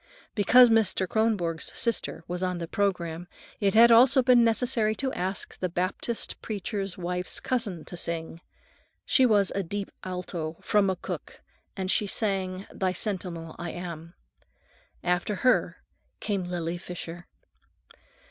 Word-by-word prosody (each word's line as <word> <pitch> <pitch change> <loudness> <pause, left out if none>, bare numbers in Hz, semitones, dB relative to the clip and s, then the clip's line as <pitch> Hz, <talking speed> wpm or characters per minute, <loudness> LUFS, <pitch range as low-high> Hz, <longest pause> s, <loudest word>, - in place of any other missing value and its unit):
Because 235 +4 +6
Mr. 210 -4 +3
Kronborg's 195 -7 0
sister 230 -7 0
was 180 +1 -3
on 180 -1 -1
the 170 -1 -5
programme, 175 -3 -1 0.3
it 200 -1 +1
had 235 +1 +8
also 255 +3 +7
been 245 -1 +6
necessary 230 -1 +1
to 265 +3 -3
ask 190 +2 -3
the 185 - -1
Baptist 185 +6 -2
preacher's 200 -2 -4
wife's 180 0 -2
cousin 210 -10 -2
to - - -7
sing. 165 -1 -3 0.6
She 260 -2 +4
was 205 -4 +3
a 200 - 0
"deep 200 +2 -4
alto" 175 -3 -4
from 205 -1 +2
McCook, 190 -2 -4 0.4
and 190 0 -1
she 210 - +2
sang, 190 -2 -1
"Thy 185 -1 -1
Sentinel 175 -5 -4
Am 170 -1 -6 0.9
I." - - -9
After 180 +4 +1
her 250 +6 +1 0.4
came 200 -4 -2
Lily 175 -1 -3
Fisher. 175 -1 -8
190 Hz, 135 wpm, -27 LUFS, 175-215 Hz, 0.9 s, had